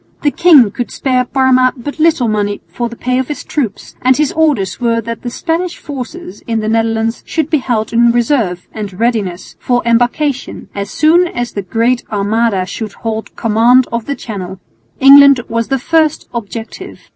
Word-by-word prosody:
The 290 - +2
king 300 - +5
could 245 +3 -4
spare 255 -2 0
Parma 255 -1 +2
but 285 +6 -7
little 310 -6 +2
money 205 -1 -1
for 240 -1 -4
the 235 - -9
pay 250 +2 -1
of 260 - -2
his 295 - -5
troops, 245 -10 -4
and 255 0 +3
his 300 -2 +1
orders 290 -13 0
were 230 -1 +1
that 230 +1 -6
the 245 - -4
Spanish 340 +7 -3
forces 275 - -8
in 225 -1 0
the 215 - -3
Netherlands 225 0 0
should 320 -2 -2
be 310 - +3
held 230 -4 -2
in 235 0 +4
reserve 235 -7 0
and 205 -3 -7
readiness 215 -6 -2
for 245 -1 0
embarkation, 245 +4 -1
as 200 0 -4
soon 335 +4 +3
as 240 -7 -4
the 200 - -4
Great 230 +6 0
Armada 205 -1 0
should 210 +2 -6
hold 220 -1 -5
command 235 +3 +3
of 235 -1 -2
the 280 - -3
Channel. 190 -6 -7 0.4
England 280 -1 +8
was 230 0 -2
the 270 - 0
first 315 +3 +1
objective. 230 0 -7
240 Hz, 180 wpm, -14 LUFS, 220-275 Hz, 0.4 s, England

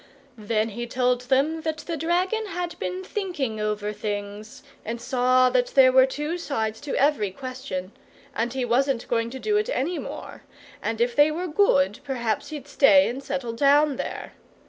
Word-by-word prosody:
Then 215 +1 0
he 240 +3 -5
told 250 0 +1
them 295 +5 +2
that 315 0 -2
the 330 +2 -5
dragon 360 +7 0
had 350 -2 -4
been 185 0 -4
thinking 300 - -3
over 210 0 -2
things, 205 +2 -6 0.2
and 230 +2 -4
saw 255 +1 +3
that - - +2
there 260 -2 +7
were 260 0 +6
two 295 +6 -3
sides 220 -8 -3
to 290 - -4
every 275 -8 +2
question, 255 -4 -6 0.4
and 235 0 -1
he 260 -1 -2
wasn't 245 +1 +1
going 230 -1 0
to 260 - -7
do 420 +9 0
it 425 +4 0
any 340 - -1
more, - - -8 0.4
and 225 0 -3
if 240 0 +1
they 290 +1 +6
were 335 +4 -3
good 210 - +2
perhaps 235 -5 -2
he'd 295 -3 -7
stay 285 0 +5
and 255 +3 -4
settle 255 -4 -3
down 285 +3 +3
there. - - -5
260 Hz, 175 wpm, -25 LUFS, 225-300 Hz, 0.4 s, there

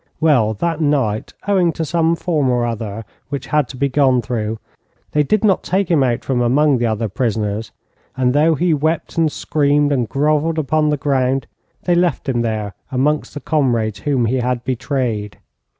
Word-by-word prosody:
Well, 125 -9 +3
that 165 +7 -2
night, 135 -8 0
owing 185 -4 +3
to 160 - -3
some 165 +1 +1
form 155 -6 0
or 120 -1 +1
other 110 -2 -4 0.2
which 140 -2 -4
had 150 -3 +1
to 130 - -10
be 140 - +1
gone 130 -3 +2
through, 110 -1 -3 0.5
they 150 - +2
did 210 +9 +1
not 200 -3 +3
take 190 -1 -1
him 160 -4 +4
out 120 -3 0
from 125 -2 0
among 135 +3 +3
the 120 - +1
other 110 0 -1
prisoners, 105 0 -2 0.5
and 125 -1 +2
though 155 +3 +3
he 170 +2 +1
wept 155 +2 -1
and 160 -2 +2
screamed, 145 -1 +1
and 125 -5 0
grovelled 155 +3 +1
upon 155 0 +1
the 150 - +1
ground, 135 -2 0 0.4
they 175 - +2
left 175 -5 +1
him 120 -3 0
there 110 -3 -2 0.2
amongst 145 +5 0
the 145 - -5
comrades 120 -9 0
whom 135 -1 0
he 125 +4 0
had 125 -1 -1
betrayed. 125 -5 -2
135 Hz, 180 wpm, -18 LUFS, 120-155 Hz, 0.5 s, him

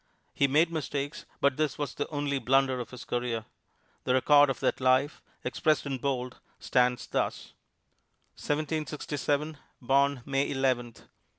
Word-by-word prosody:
He 140 - +3
made 155 +5 +3
mistakes, 145 -1 -4 0.2
but 140 -2 +3
this 155 -3 0
was 145 -1 -3
the 145 - -3
only 145 -2 -2
blunder 135 0 +2
of 120 - -5
his 125 -1 -10
career. 120 -2 -2 0.6
The 125 - +2
record 145 +2 +6
of 135 - -2
that - - 0
life 130 +3 +2 0.2
expressed 155 -4 +1
in 135 -2 -3
bold 125 -2 -2 0.2
stands 125 -1 +1
thus: - - -3 0.8
1767 150 0 -2 0.2
Born 135 0 +2
May 135 0 0
Eleventh. 130 -4 -1
140 Hz, 135 wpm, -29 LUFS, 130-145 Hz, 0.8 s, record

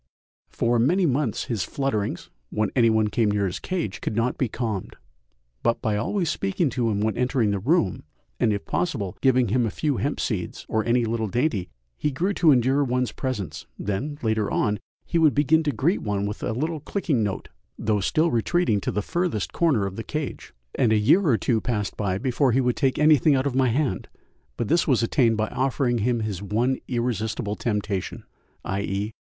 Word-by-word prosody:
For 120 0 +1
many 175 +10 +3
months 135 -5 0
his 110 -6 -2
flutterings, 135 -8 -2 0.2
when 110 0 -1
any 120 -3 +5
one 110 -1 +2
came 110 -1 +1
near 100 -1 +1
his 90 - -3
cage, 170 - -3
could - - -3
not 115 +2 +1
be 130 - 0
calmed, 110 -4 -4 0.7
but 115 - +1
by 110 -1 0
always 170 - -1
speaking 180 -2 0
to 115 -1 0
him 105 -1 0
when 110 0 0
entering 125 -3 +1
the 100 - -1
room, 115 - +1 0.4
and - - +3
if 100 -1 -3
possible 110 - -2
giving 130 -4 +3
him 125 +4 +2
a 115 - 0
few 145 +4 -1
hemp 145 +1 -1
seeds 100 -7 -3
or 110 0 0
any 120 +1 +2
little 110 -1 -1
dainty, 115 - -1 0.3
he 150 - +1
grew 175 +9 -1
to 170 -5 +4
endure 135 +2 +3
one's 125 -3 0
presence; 115 -9 -4
then, 130 +10 -3
later 110 -2 +1
on, 105 0 0 0.3
he 170 - 0
would 155 -3 +4
begin 150 +3 +4
to 150 -2 0
greet 145 - 0
one 100 -2 -1
with 105 0 -5
a - - -1
little 155 +6 -2
clicking 150 - -1
note, 100 -3 -3 0.3
though 105 -1 0
still 155 - +1
retreating 120 - +1
to - - -2
the 105 +1 -2
furthest 170 - -2
corner 150 -12 +2
of 95 0 -5
the 115 - -4
cage, 150 0 -5 0.2
and 120 -5 +2
a 110 - +4
year 115 - +4
or 120 -6 +4
two 115 -2 0
passed 105 -5 -2
by 95 -3 -1
before 130 +2 +1
he 130 - +3
would 125 -1 +1
take 135 -3 +1
anything 150 -1 +5
out 130 0 +1
of 140 - 0
my 130 0 +3
hand, 125 -5 -1 0.5
but 120 - -1
this 170 +7 +2
was 130 -5 +3
attained 115 -2 +2
by 110 0 0
offering 130 -2 0
him 120 +2 +1
his 105 -4 -3
one 115 +6 0
irresistible 110 -3 -2
temptation, 105 -4 -3 0.4
_i.e. 100 +2 -2
120 Hz, 200 wpm, -24 LUFS, 105-140 Hz, 0.7 s, any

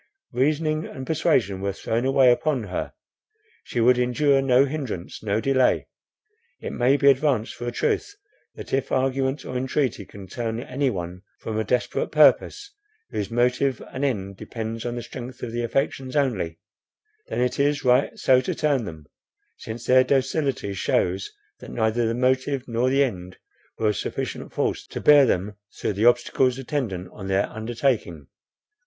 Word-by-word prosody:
Reasoning 155 +4 0
and 130 - -8
persuasion 130 - +1
were 100 0 -1
thrown 115 +5 -2
away 135 -1 +5
upon 135 -1 0
her; 95 -3 -4 0.7
she 120 - -4
would 125 +2 +4
endure 135 +3 +3
no 135 0 +4
hindrance, 135 - -5
no 105 0 0
delay. 130 +1 +2 0.7
It - - -5
may 130 +3 +3
be 140 - +2
advanced 135 -5 0
for 120 - -7
a - - -1
truth, 410 - -1 0.4
that, - - -9
if 135 0 0
argument 135 +1 0
or 130 - -6
entreaty 130 -5 -1
can 100 -1 -11
turn 115 +4 -4
any 135 +2 -1
one 90 -4 -5 0.2
from 110 -1 -4
a - - +1
desperate 125 +2 -1
purpose, 410 0 +3 0.4
whose 100 - -3
motive 125 +3 +1
and 130 - -3
end 100 -8 -2
depends 115 +2 -5
on 120 - -3
the 120 - -5
strength 125 +1 -9
of 120 - -4
the 120 +1 -2
affections 130 +2 -2
only, 110 - 0 0.7
then - - -3
it 125 +1 0
is 145 0 +1
right 125 +2 +3
so 130 -1 +4
to - - -3
turn 145 -6 +1
them, 80 -4 -9 0.5
since 115 +1 -7
their 130 0 +6
docility 135 -5 0
shews, 95 0 0 0.3
that - - -10
neither 115 0 0
the 115 - -1
motive 130 +2 0
nor 120 +2 +1
the 135 +2 +4
end 90 -8 -5 0.4
were 110 - +1
of 105 - -1
sufficient - - -4
force - - -2
to - - -6
bear 145 -2 +7
them 100 +1 -1 0.2
through - - -1
the 105 +4 0
obstacles 120 +1 +3
attendant 120 - -3
on 95 -2 -8
their 95 +1 +1
undertaking. 110 - -2
125 Hz, 165 wpm, -24 LUFS, 110-135 Hz, 0.7 s, bear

